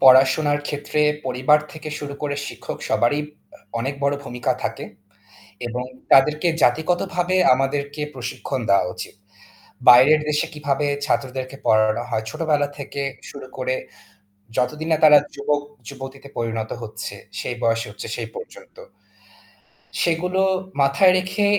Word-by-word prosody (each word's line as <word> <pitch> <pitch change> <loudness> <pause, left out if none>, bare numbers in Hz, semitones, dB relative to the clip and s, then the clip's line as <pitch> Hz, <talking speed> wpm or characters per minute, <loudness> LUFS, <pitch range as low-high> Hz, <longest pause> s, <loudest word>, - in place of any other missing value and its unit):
পড়াশোনার 135 +3 +6
ক্ষেত্রে 145 +1 -2 0.3
পরিবার 130 +4 +4
থেকে 155 -1 -8
শুরু 145 -1 -6
করে 145 -1 -1
শিক্ষক - - -7
সবারই 145 +5 +2 0.4
আ - - -24 0.2
অনেক 135 +4 -2
বড় 140 0 +2
ভূমিকা 125 -2 -1
থাকে। - - -3 0.8
এবং 125 +1 -3 0.3
তাদেরকে 150 +5 +5
জাতিগতভাবে 180 +2 +1 0.2
আমাদেরকে 140 +2 -2
প্রশিক্ষণ 130 +1 -4
দেওয়া 100 -2 +4
উচিত। 90 - -8 0.7
বাইরের 130 +5 +8
দেশে 150 0 +1
কিভাবে 145 -1 -1 0.2
ছাত্রদেরকে 130 0 -2
পড়ানো 110 +1 +3
হয় 110 -2 -1
ছোটবেলা 150 0 0
থেকে 140 0 -5 0.3
শুরু - - -9
করে - - -1 0.8
যতদিন 150 +6 -1
না - - +5
তারা 150 -1 +9 0.2
যুবক 145 +1 0 0.3
যুবতীতে 135 +1 -9
পরিণত 115 -1 -2
হচ্ছে 110 -2 -6 0.3
সেই 120 - -3
বয়সে 115 0 +1
হচ্ছে - - -8
সেই - - -4
পর্যন্ত। - - -11 1.3
সেগুলো 180 +3 +1 0.4
মাথায় 140 +7 +5
রেখে 185 +3 0
140 Hz, 125 wpm, -22 LUFS, 125-155 Hz, 1.3 s, তারা